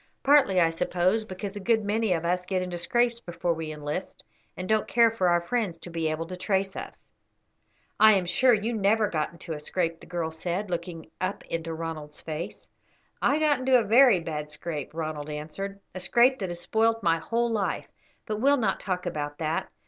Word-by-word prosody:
"Partly, 275 -10 +5
I 165 -2 +4
suppose, 180 +5 +1
because 195 +1 -6
a - - -4
good 220 +1 +1
many 215 0 +1
of 170 -1 0
us 180 +1 0
get 185 -1 0
into 180 -1 -4
scrapes 240 +6 +1
before 175 -4 -2
we 160 -1 -5
enlist, 150 +4 -5 0.3
and 185 - -4
don't 215 0 +2
care 230 -1 +4
for 190 -5 +1
our 175 0 +3
friends 195 -2 -1
to 175 +1 -10
be 165 -1 -1
able 155 +1 -2
to 180 +2 -7
trace 195 +1 -1
us." - - -9 0.9
"I 220 0 +8
am 190 -3 +2
sure 255 +8 +4
you 220 +3 -2
never 215 0 +2
got 155 -2 -1
into 170 0 -7
a 150 - -5
scrape," 165 +1 -2
the - - -14
girl 170 -2 -2
said, 180 +4 -3
looking 170 -2 -5
up 185 +2 -3
into 165 0 -4
Ronald's 160 -2 -6
face. 165 +5 -6 0.5
"I 285 - +3
got 300 -3 +2
into 260 0 +4
a 235 - +2
very 230 -1 +6
bad 150 -2 -5
scrape," 150 -1 -5
Ronald 155 -2 -4
answered, 160 +7 -5
"a 185 - -5
scrape 240 +7 +3
that 190 -3 -3
has 175 0 -5
spoilt 225 +4 +1
my 165 -1 +3
whole 235 +7 0
life; 210 -3 -1 0.4
but 215 -2 -3
we 265 +6 +3
will 285 - +5
not 210 -6 0
talk 185 -2 -3
about 145 -4 -3
that. 160 0 -2
180 Hz, 205 wpm, -27 LUFS, 165-220 Hz, 0.9 s, I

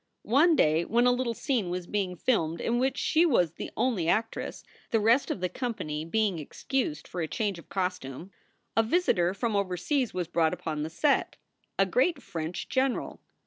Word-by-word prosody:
One 305 +9 +4
day 155 - +3
when 235 +6 +2
a 250 - +6
little 245 -2 -1
scene 235 -7 -1
was 180 0 -3
being 190 -2 -2
filmed 170 -6 0
in 240 +1 0
which 265 +1 +1
she 325 +1 +3
was 205 - +3
the - - -7
only 220 -10 +1
actress, 225 +5 -1 0.3
the 225 - +2
rest 230 +6 +3
of - - -3
the 180 - +1
company 165 - -4
being 200 -1 0
excused 155 - -3
for 175 - -4
a 160 - -1
change 200 0 -2
of - - -16
costume, 180 -3 -3 0.4
a 225 - +5
visitor 220 - +2
from 225 0 -1
overseas 200 - 0
was 180 -2 -3
brought 165 -2 +1
upon 155 -2 -4
the 155 - -3
set, 275 - +1 0.4
a - - +4
great 360 - +2
French 165 -6 -5
general. 265 -1 -1
200 Hz, 185 wpm, -28 LUFS, 170-250 Hz, 0.4 s, a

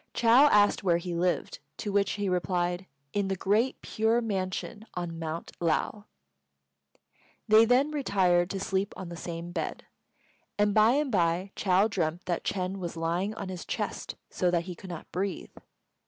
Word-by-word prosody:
Chou 235 - 0 0.2
asked 205 -3 +4
where 175 -3 +3
he 175 0 -4
lived, 175 +1 -1 0.2
to 205 - -3
which 200 -1 +2
he 205 -1 -2
replied, 180 0 -1 0.3
"In 205 -1 0
the 190 - -1
Great 215 +7 +1
Pure 225 +2 +1
Mansion 205 +1 -3
on 170 -2 -4
Mount 165 0 -5
Lao." 175 +5 0 1.4
They 215 +1 +7
then 255 +5 +3
retired 185 -11 +2
to 195 - -3
sleep 195 +1 -1
on 185 - -6
the 170 - -7
same 170 +1 -6
bed; - - -4 0.7
and 205 0 +3
by 220 +3 +5
and 290 -1 +1
by 180 0 +1
Chou 190 +1 +3
dreamt 175 -4 -2
that 175 -2 -2
Ch'êng 185 0 -2
was 175 -3 -5
lying 175 +6 -1
on 195 - -5
his 180 -2 -5
chest - - -4 0.2
so 180 - +1
that 175 -1 +1
he 180 +1 -6
could 185 +2 -11
not 170 -3 -8
breathe. 195 +2 -3
185 Hz, 170 wpm, -28 LUFS, 175-205 Hz, 1.4 s, They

